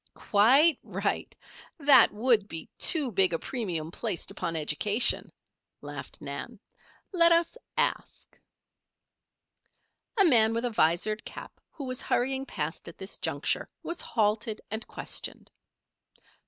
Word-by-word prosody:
"Quite 265 +9 +4
right. - - -3 0.4
That 285 -3 +6
would 215 -1 +2
be 165 -4 -7
too 295 -7 +2
big 190 -3 +2
a - - +1
premium 170 -9 -4
placed 205 -2 -2
upon 165 - -4
education," 180 +9 +2 0.5
laughed - - -9
Nan. - - -6 0.5
"Let 340 -2 +5
us 335 +4 +2 0.2
ask." - - -1 1.8
A 400 - +6
man 225 -7 +5
with 230 +2 -1
a 245 - -1
visored 205 +3 +1
cap - - -10
who 290 - -9
was 255 -1 -3
hurrying 265 +2 -1
past 150 +2 -5
at 170 - -9
this 190 +1 -6
juncture, - - -2
was 340 +1 -5
halted 215 0 -1
and 220 +1 -2
questioned. - - -5
220 Hz, 125 wpm, -28 LUFS, 190-265 Hz, 1.8 s, That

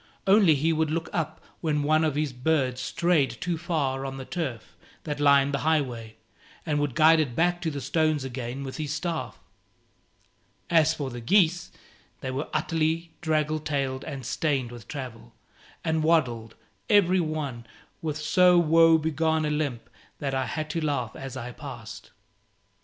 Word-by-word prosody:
Only 195 -5 +6
he 160 +4 +1
would 160 -1 +1
look 165 +1 -2
up 160 -1 -2 0.2
when 150 -3 0
one 155 +2 +3
of 155 -3 0
his 150 -2 -1
birds 130 -1 0
strayed 135 -4 +1
too 175 -1 -1
far 150 -6 -1
on 135 0 -5
the 130 - -7
turf 140 -10 -5 0.3
that 150 -2 -4
lined 140 -1 +4
the 140 - 0
highway, 125 -8 -1 0.5
and 150 -3 0
would 145 -4 -1
guide 160 +1 +6
it 135 -6 -1
back 175 +3 +1
to 165 - -1
the 145 -2 -4
stones 155 +2 +1
again 130 0 -5
with 135 -1 -6
his 150 -2 -3
staff. 165 +1 -3 1.3
As 160 -1 +4
for 140 -3 -4
the 120 0 -7
geese, 175 - +3 0.5
they 130 - -3
were 135 +3 -3
utterly 165 +1 -1
draggle 155 -1 0
tailed 140 -3 -2
and 140 -4 -6
stained 135 -6 -1
with 120 -2 -11
travel, 125 - -8 0.5
and 160 -1 +1
waddled, 125 -9 +1 0.3
every 190 -3 +5
one, 145 -7 -4 0.3
with 155 -2 -3
so 180 +4 +4
woe 165 0 +6
begone 160 0 0
a 150 - -1
limp 145 -6 -2 0.3
that 140 -2 -3
I 130 -1 0
had 155 -1 -3
to 165 +1 -2
laugh 140 -7 -1
as 135 -1 -7
I 125 0 -6
passed. 115 -7 -9
150 Hz, 165 wpm, -26 LUFS, 130-160 Hz, 1.3 s, Only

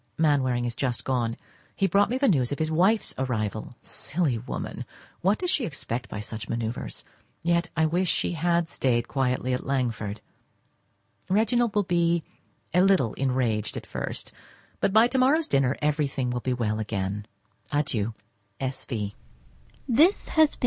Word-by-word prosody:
Mainwaring 130 -6 +2
is 120 -1 -2
just 125 -3 -1
gone; 120 -3 0 0.4
he 195 - +2
brought 200 +3 +3
me 250 - 0
the 275 +1 +3
news 135 - +3
of 145 - -1
his 155 +1 -1
wife's 190 +7 +3
arrival. 110 -3 -2
Silly 145 -8 -1
woman, 120 - -5 0.4
what 195 +4 +3
does 360 -1 0
she 275 - +1
expect 125 - -3
by 105 - -5
such 110 +1 -6
manoeuvres? 115 0 -3 0.4
Yet 170 0 +2
I 160 - +4
wish 175 +3 +1
she - - +1
had 170 0 +1
stayed 120 -5 0
quietly 130 -2 0
at 125 - -2
Langford. 115 -6 -1 1.1
Reginald 220 +3 +2
will 205 - +4
be 170 -2 +2 0.5
a 180 - +5
little 185 - +4
enraged 125 -5 0
at - - -6
first, - - -5 0.5
but - - +2
by 220 +3 +6
to 260 +1 0
morrow's 300 +5 +4
dinner, 135 -1 +2
everything 145 -4 0
will 125 - -1
be 125 +1 -1
well 110 -3 -1
again. 105 -1 -3 0.4
Adieu! 115 -7 0 0.4
S. 130 0 -3
V. 105 -5 -3
135 Hz, 150 wpm, -26 LUFS, 120-175 Hz, 1.1 s, by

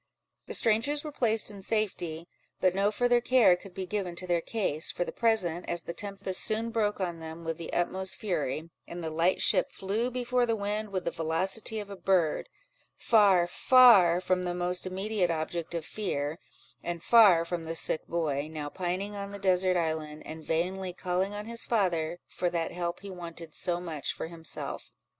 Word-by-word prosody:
The - - -2
strangers 250 +7 +2
were 305 - -5
placed 225 -6 0
in 200 -1 -10
safety, 175 -6 -2 0.3
but 185 -1 +3
no 200 +2 +2
farther 245 +2 +2
care 240 -7 +5
could 180 +1 -13
be 190 - -3
given 185 -2 -3
to 185 - -5
their 175 -2 +1
case, 165 -7 0
for - - -1
the - - -5
present, 185 -7 0
as 170 -1 -2
the 170 - -5
tempest 195 -2 0
soon 225 +1 0
broke 210 -3 0
on 175 -3 -2
them 160 +1 -8
with 165 0 -4
the 165 - -6
utmost 190 +2 -1
fury, 165 - -2 0.2
and 170 0 -7
the 160 - -3
light 165 +4 +2
ship 185 - +4
flew 210 +5 -2
before 250 0 0
the 230 - +1
wind 210 +1 -2
with 190 -2 -3
the 170 - 0
velocity 185 +7 -2
of 205 -1 -7
a - - -5
bird, 185 - +1 0.5
far, 200 -6 +5
far 195 -3 +6
from 185 0 0
the 175 -1 -2
more 180 0 -1
immediate 190 0 -1
object 165 +1 -3
of 165 -2 -3
fear, 160 -6 -3 0.4
and 170 -1 -4
far 200 -8 +7
from 170 -1 -4
the 165 +1 -4
sick 160 - 0
boy, 155 -3 -1
now 150 -2 -5
pining 185 +4 -3
on 200 0 -5
the 200 - -6
desert 185 -1 +2
island, 155 -2 -3
and 160 0 -8
vainly 180 +4 -1
calling 185 +2 -1
on 210 0 -5
his 230 +1 -2
father 175 -7 0
for 180 - -2
that 170 -1 -2
help 175 -1 -3
he 200 0 -8
wanted 170 -3 -9
so 175 -2 -1
much 160 -5 -4
for - - -5
himself. 165 -1 -6
180 Hz, 190 wpm, -29 LUFS, 170-205 Hz, 0.5 s, far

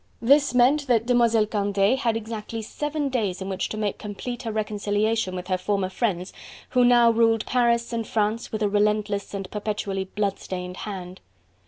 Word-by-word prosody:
This 280 +2 +4
meant 275 +4 +4
that 230 -3 +2
Demoiselle 235 -3 +3
Candeille 205 +1 +1
had 230 -4 0
exactly 225 0 -6
seven 295 +5 -3
days 215 -8 -1
in 190 0 -5
which 190 -1 -2
to 215 - -5
make 210 -2 -2
complete 230 +4 -6
her 230 -3 -4
reconciliation 210 -1 -1
with 180 -1 -5
her 185 0 -1
former 195 0 -1
friends 185 -3 -2 0.4
who 250 -1 +3
now 240 -1 +6
ruled 225 -1 +2
Paris 235 -1 +1
and 230 -1 -2
France 215 +1 -1
with 215 -1 -2
a - - +3
relentless 205 0 0
and 195 -1 -4
perpetually 205 -2 -3
bloodstained 185 -2 -4
hand. 185 -3 -7
215 Hz, 170 wpm, -24 LUFS, 200-235 Hz, 0.4 s, now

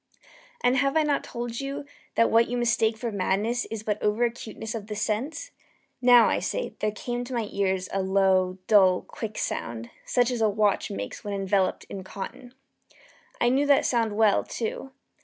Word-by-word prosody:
And 250 +2 +3
have 275 +3 +2
I 315 - +4
not 290 -2 0
told 235 -1 -5
you 275 +1 -4 0.3
that 230 - +3
what 230 +1 +5
you 245 - -2
mistake 225 -2 +2
for 235 0 -3
madness 205 +5 0
is 220 -1 -6
but 210 -1 -2
over 210 +3 +1
acuteness 230 -1 -4
of 215 -3 -6
the 210 - -5
sense? 265 - -2 0.5
now, 245 -2 +7
I - - +1
say, - - -3
there 215 - +1
came 240 +3 -4
to 250 +1 -6
my 230 -3 -1
ears 190 -2 0
a 195 - +1
low, 190 -1 +2
dull, 190 -4 +5
quick 215 -2 -7
sound, 115 0 -4
such 245 0 +1
as 240 -2 -2
a 220 - +4
watch 205 -1 +1
makes 100 +1 -6
when 205 -1 -3
enveloped 195 -1 0
in 190 - -8
cotton. 225 +6 -8 0.8
I 240 - +3
knew 275 +3 +2
that 285 -1 +4
sound 225 -4 +1
well, 215 -2 +4
too. 235 +3 -4
220 Hz, 185 wpm, -26 LUFS, 200-245 Hz, 0.8 s, now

